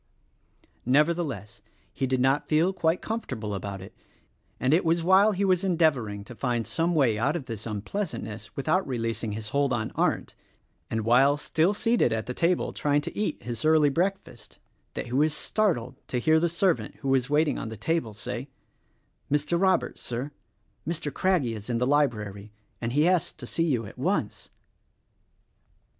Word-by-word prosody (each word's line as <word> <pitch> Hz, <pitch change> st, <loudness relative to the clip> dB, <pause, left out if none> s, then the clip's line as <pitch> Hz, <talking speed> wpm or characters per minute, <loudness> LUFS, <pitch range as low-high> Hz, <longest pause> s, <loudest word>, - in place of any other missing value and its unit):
■ -, -, -27 dB, 0.2 s
Nevertheless, 135 Hz, -, 0 dB, 0.3 s
he 135 Hz, -, -1 dB
did 130 Hz, 0 st, 0 dB
not 135 Hz, +3 st, +2 dB
feel 165 Hz, +5 st, +3 dB
quite 165 Hz, -1 st, 0 dB
comfortable 110 Hz, -, -4 dB
about 100 Hz, 0 st, -5 dB
it; 95 Hz, -, -12 dB, 0.7 s
and 130 Hz, +3 st, +2 dB
it 170 Hz, -, +4 dB
was 165 Hz, 0 st, +1 dB
while 190 Hz, +4 st, +5 dB
he 200 Hz, 0 st, 0 dB
was 185 Hz, -1 st, +2 dB
endeavoring 145 Hz, -, +1 dB
to 120 Hz, -, -10 dB
find 120 Hz, -1 st, -1 dB
some 170 Hz, +1 st, 0 dB
way 120 Hz, -8 st, +3 dB
out 145 Hz, +7 st, +1 dB
of 155 Hz, -6 st, -4 dB
this 115 Hz, -3 st, -6 dB
unpleasantness 110 Hz, -, -5 dB
without 160 Hz, +7 st, +1 dB
releasing 115 Hz, -4 st, -2 dB
his 105 Hz, 0 st, -5 dB
hold 140 Hz, +1 st, +1 dB
on 110 Hz, -3 st, -1 dB
Arndt -, -, 0 dB, 0.3 s
— -, -, -44 dB
and 110 Hz, -, -1 dB
while 135 Hz, +5 st, +5 dB
still 160 Hz, +5 st, +1 dB
seated 230 Hz, -, +2 dB
at 110 Hz, -1 st, -1 dB
the 125 Hz, -, -4 dB
table 170 Hz, +5 st, +1 dB
trying 145 Hz, 0 st, +1 dB
to -, -, -6 dB
eat 210 Hz, -7 st, -2 dB
his 120 Hz, -2 st, -4 dB
early 155 Hz, -1 st, +5 dB
breakfast 170 Hz, -, -3 dB, 0.2 s
— -, -, -44 dB
that -, -, -3 dB
he 120 Hz, -, -8 dB
was 150 Hz, +3 st, +2 dB
startled 140 Hz, -, 0 dB
to 125 Hz, -, -2 dB
hear 155 Hz, +6 st, +4 dB
the 170 Hz, +1 st, +1 dB
servant 175 Hz, +1 st, 0 dB
who 135 Hz, -, -2 dB
was 135 Hz, -1 st, +2 dB
waiting 150 Hz, +1 st, +2 dB
on 115 Hz, -, -5 dB
the 110 Hz, -, -7 dB
table 115 Hz, -2 st, -1 dB
say: 125 Hz, +4 st, -5 dB, 0.8 s
"Mr. 150 Hz, +4 st, +1 dB
Robert, 190 Hz, -1 st, +2 dB
Sir! 125 Hz, +4 st, -4 dB, 0.6 s
Mr. 160 Hz, -4 st, -3 dB
Craggie 170 Hz, -11 st, +1 dB
is 110 Hz, +1 st, -8 dB
in 120 Hz, -, 0 dB
the 125 Hz, -, +1 dB
library, 110 Hz, -8 st, 0 dB, 0.3 s
and 115 Hz, 0 st, -2 dB
asks 160 Hz, +5 st, +2 dB
to 130 Hz, -, -10 dB
see 165 Hz, +7 st, 0 dB
you 125 Hz, -8 st, 0 dB
at -, -, -11 dB
once." -, -, -1 dB
140 Hz, 180 wpm, -27 LUFS, 115-165 Hz, 0.8 s, while